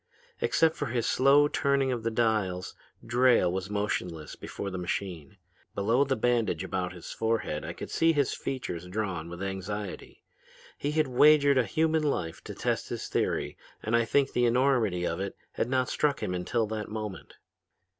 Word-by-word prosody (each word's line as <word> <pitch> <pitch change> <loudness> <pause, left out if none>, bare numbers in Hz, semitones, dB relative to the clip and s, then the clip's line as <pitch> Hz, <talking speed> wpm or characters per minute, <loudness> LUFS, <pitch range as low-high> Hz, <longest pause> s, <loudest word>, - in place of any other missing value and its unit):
"Except 165 - +3
for 145 - -3
his 120 -1 -1
slow 140 +2 +5
turning 140 -2 +1
of 120 -2 -2
the 115 - 0
dials 110 -6 0 0.3
Drayle 120 -6 +4
was 95 +1 -3
motionless 90 -6 -3
before 100 - -6
the 95 - -4
machine. 90 +1 -4 0.4
Below 115 +7 +2
the 135 -1 0
bandage 115 -7 +1
about 90 -1 -2
his 90 -2 -9
forehead 110 -9 -1
I - - -5
could - - -8
see 165 0 +3
his 145 -4 +1
features 90 -10 -4
drawn 90 -4 -3
with 85 +2 -6
anxiety. 95 +1 -5 0.5
He 145 - -3
had 155 -1 +2
wagered 140 +1 +5
a 125 - +2
human 160 +2 +1
life 85 - -2
to - - -7
test - - -1
his - - -5
theory - - -1 0.2
and 110 +2 +1
I 115 0 +3
think 140 +3 +2
the 125 - +2
enormity 120 -8 +2
of 85 - -2
it 100 0 -4 0.2
had 120 - -2
not 130 -1 +1
struck 145 -2 0
him 90 - -1
until 100 +6 0
that 110 0 -4
moment. 105 -2 -6
110 Hz, 175 wpm, -28 LUFS, 95-135 Hz, 0.5 s, slow